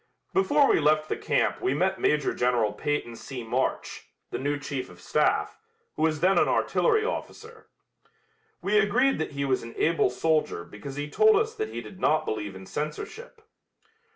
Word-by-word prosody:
Before 295 -7 +4
we - - +4
left 155 0 +2
the - - 0
camp - - 0
we 130 - +1
met 190 +4 0
Major 150 -2 +2
General 120 -3 +1
Peyton 145 -5 -2
C. 125 +1 -7
March, 115 - -2 0.2
the - - -3
new 145 +2 -1
chief 140 -2 -5
of 90 - -15
staff, - - 0 0.4
who - - -5
was 155 -1 +1
then 190 +2 +4
an - - +3
artillery 435 -2 +2
officer. 450 -2 -6 1.0
We 210 +2 +3
agreed 250 +7 +2
that 160 - -3
he 140 0 -2
was 130 -2 +1
an 115 0 -10
able 165 +1 +2
soldier 155 - 0
because 105 +10 -9
he 145 +1 -3
told 435 - +4
us 440 +2 +1
that 435 -1 -3
he - - -5
did 190 - -12
not 155 -3 +2
believe 105 -3 -4
in 95 0 -10
censorship. 440 - -6
155 Hz, 180 wpm, -27 LUFS, -, 1.0 s, Before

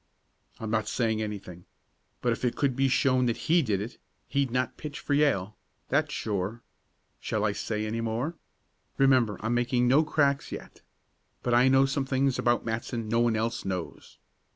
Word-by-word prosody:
"I'm 110 -1 -4
not 110 -1 0
saying 110 -1 0
anything. 95 -5 -6 0.6
But 120 - +1
if 115 - -3
it 125 - +1
could 140 -3 +1
be 135 +1 +2
shown 130 -1 +3
that 115 - 0
he 170 +2 +3
did 105 -9 0
it, 110 +5 -6 0.3
he'd 140 -2 +1
not 125 +1 -1
pitch 150 -2 -7
for 145 - -2
Yale 120 -9 +2 0.3
that's 150 +2 +1
sure. 105 -1 -3 0.6
Shall 110 -1 -1
I 105 - +2
say 105 +1 -3
any 115 +2 -2
more? 115 +8 -2 0.6
Remember 130 -6 +4
I'm 110 +3 -1
making 120 0 +2
no 140 +5 +5
cracks 140 -2 +1
yet. - - -9 0.6
But 120 - 0
I 125 +2 +5
know 135 +1 +5
some 135 0 -1
things 135 -1 +1
about 120 0 +2
Matson 115 0 -3
no 115 +1 +2
one 120 -1 +3
else 115 +2 -1
knows." 95 -3 -5
120 Hz, 175 wpm, -28 LUFS, 110-135 Hz, 0.6 s, no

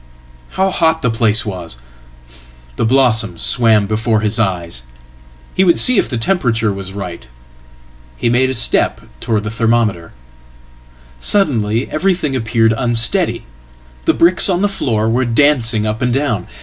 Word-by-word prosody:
How 190 0 +1
hot 160 -3 +1
theplace 115 -2 +1
was! 90 - -5 1.0
The - - -1
blossoms 120 -3 +1
swam 110 -4 +2
before 110 +1 -1
his 110 0 -1
eyes. 85 - -2 0.7
He 190 - +2
would 175 -3 +3
see 250 -5 +4
if - - -1
the 120 - -3
temperature 115 - 0
was 95 -1 -7
right. 90 -8 -8 0.9
He - - -1
made 125 +2 +2
a 130 - -2
step 115 - +1 0.2
towards 110 -3 -1
thethermometer. 110 -5 -1 1.1
Suddenly 120 - +1
everything 170 -4 -1
appeared 115 -2 +1
unsteady. 120 -2 0 0.6
The - - +2
bricks 175 +4 +4
on 180 -1 0
thefloor 125 - 0
were 120 +3 +1
dancing 120 -3 +1
up 110 +3 -3
and 125 -1 0
down. 120 -8 -1
115 Hz, 135 wpm, -15 LUFS, 105-135 Hz, 1.1 s, see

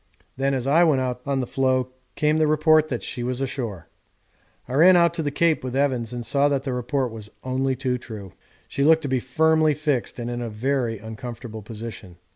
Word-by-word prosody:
Then 135 +1 0
as 130 -1 -2
I 155 +5 +5
went 155 -6 +3
out 125 -1 -2
on 135 -1 0
the - - -2
floe 130 0 0 0.3
came 150 +1 +2
the 155 - +3
report 155 0 +4
that 125 -5 -4
she 120 - -4
was 125 +1 -2
ashore. 120 - -4 0.8
I 125 - -6
ran 175 +7 +7
out 170 -1 +4
to 170 - -3
the 145 - -1
Cape 160 +1 +1
with 130 0 -4
Evans 130 -5 0
and 120 -1 -5
saw 140 +5 +2
that 140 -2 0
the 135 -2 -3
report 125 +1 -1
was 110 -2 -9
only 130 +1 0
too 125 -1 -1
true. 110 -6 -9 0.3
She 140 - -2
looked 160 +2 +5
to - - -2
be 130 -1 +1
firmly 155 +4 +2
fixed 145 -5 -1
and 120 -1 -4
in 120 0 -3
a 120 - -3
very 120 +1 -1
uncomfortable 110 +1 -8
position. 105 -4 -9
130 Hz, 215 wpm, -24 LUFS, 120-145 Hz, 0.8 s, ran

